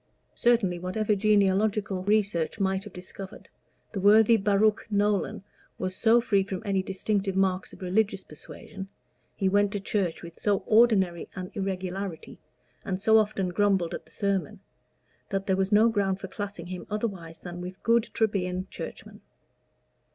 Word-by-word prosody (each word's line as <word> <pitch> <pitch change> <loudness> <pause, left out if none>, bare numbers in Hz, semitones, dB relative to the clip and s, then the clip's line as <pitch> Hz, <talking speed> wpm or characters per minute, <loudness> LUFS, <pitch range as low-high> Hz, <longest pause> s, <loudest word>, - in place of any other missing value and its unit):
Certainly, 225 -8 +2
whatever 205 +4 0
genealogical 200 -1 +2
research 200 -5 +1
might 190 0 0
have 210 - -9
discovered, 185 +2 -9 0.4
the 200 - -4
worthy 220 +3 +6
Baruch 210 0 +2
Nolan 205 0 0 0.3
was 185 0 -3
so 230 +3 +4
free 210 -4 +2
from 190 -1 -5
any 195 -2 +1
distinctive 195 +1 -1
marks 190 -1 +1
of - - -11
religious 195 +1 +1
persuasion 190 +5 -10 0.5
he 195 - 0
went 205 +1 +3
to 205 - -1
church 195 -4 -2
with 170 -1 -11
so 205 -2 +1
ordinary 210 -7 +3
an 185 -1 -6
irregularity, 190 -2 -4 0.4
and 185 -1 -3
so 220 +2 +5
often 205 -3 0
grumbled 190 -2 +1
at - - -6
the - - -21
sermon 195 -6 -2 0.7
that 195 0 -2
there 190 -2 +2
was 190 +1 0
no 215 +2 +6
ground 200 -4 0
for 195 - -6
classing 200 -2 -6
him 180 0 -7
otherwise 195 -7 -4
than 175 0 -7
with 185 +1 -8
good 230 0 +3
Trebian 185 -4 -1
Churchmen. - - -8
195 Hz, 150 wpm, -27 LUFS, 185-210 Hz, 0.7 s, worthy